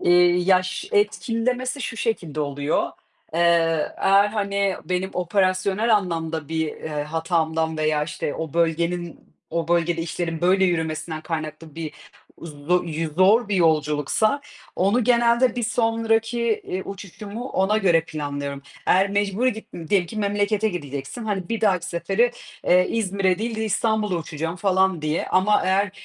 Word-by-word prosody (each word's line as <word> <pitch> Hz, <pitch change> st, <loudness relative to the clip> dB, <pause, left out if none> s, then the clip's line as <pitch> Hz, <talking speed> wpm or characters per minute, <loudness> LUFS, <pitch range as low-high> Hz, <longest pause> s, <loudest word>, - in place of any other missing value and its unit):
Hı. -, -, -7 dB
Eee, -, -, +7 dB, 0.3 s
ya 185 Hz, 0 st, +4 dB
ş 185 Hz, -, -5 dB
etkilemesi 255 Hz, -, 0 dB
şu 225 Hz, -, -4 dB
şekilde 170 Hz, -, -2 dB
oluyor, 145 Hz, +1 st, -1 dB, 0.5 s
eee, 165 Hz, -2 st, +2 dB
eğer, 200 Hz, +1 st, +4 dB
hani, 200 Hz, -2 st, -1 dB
benim 185 Hz, +2 st, -2 dB
operasyonel 190 Hz, +4 st, +2 dB
anlamda 165 Hz, -5 st, -3 dB
bir, 160 Hz, 0 st, -1 dB
eee, 160 Hz, -, -7 dB, 0.2 s
hatamdan 160 Hz, 0 st, -1 dB
veya 155 Hz, -1 st, +1 dB
işte 150 Hz, -1 st, -4 dB
o 160 Hz, -3 st, -5 dB
bölgenin 170 Hz, +1 st, 0 dB, 0.3 s
o 165 Hz, 0 st, -2 dB
bölgede 170 Hz, -1 st, +1 dB
işlerin 165 Hz, -1 st, -3 dB
böyle 190 Hz, +2 st, +4 dB
yürümesinden 160 Hz, -2 st, -1 dB
kaynaklı 155 Hz, -1 st, -5 dB
bir 160 Hz, -2 st, -5 dB, 0.5 s
zo 165 Hz, +3 st, -1 dB
yü 160 Hz, -1 st, -3 dB
zor 205 Hz, +5 st, +5 dB
bir 200 Hz, -, 0 dB
yolculuksa, 160 Hz, -, +2 dB, 0.4 s
onu 205 Hz, +6 st, +2 dB
genelde 235 Hz, 0 st, +3 dB
bir 240 Hz, -, -1 dB
sonraki, 225 Hz, 0 st, +1 dB, 0.2 s
eee, 185 Hz, +1 st, -3 dB
uçuşumu 205 Hz, +5 st, -7 dB
ona 205 Hz, 0 st, +1 dB
göre 175 Hz, -5 st, +4 dB
planlıyorum. 145 Hz, -3 st, -5 dB, 0.2 s
Eğer 190 Hz, +2 st, +4 dB
mecburi 205 Hz, +5 st, +1 dB
git 220 Hz, -, -9 dB, 0.2 s
diyelim 185 Hz, -2 st, +2 dB
ki 220 Hz, -, -9 dB
memlekete 205 Hz, +1 st, +1 dB
gideceksin, 145 Hz, -, -6 dB
hani, 195 Hz, -4 st, -3 dB
bir 230 Hz, -1 st, -2 dB
dahaki 185 Hz, -5 st, +2 dB
sefere, 195 Hz, +8 st, +1 dB, 0.4 s
eee, 180 Hz, +1 st, +5 dB
İzmir'e 195 Hz, -4 st, +1 dB
değil 225 Hz, +1 st, -3 dB
de 220 Hz, -, -1 dB
İstanbul'a 215 Hz, -2 st, 0 dB
uçacağım 165 Hz, +1 st, -4 dB
falan 190 Hz, -3 st, +1 dB
diye. 155 Hz, +1 st, -1 dB
Ama 200 Hz, +3 st, +3 dB
eğer, 190 Hz, +1 st, +2 dB
185 Hz, 145 wpm, -23 LUFS, 165-210 Hz, 0.5 s, Eee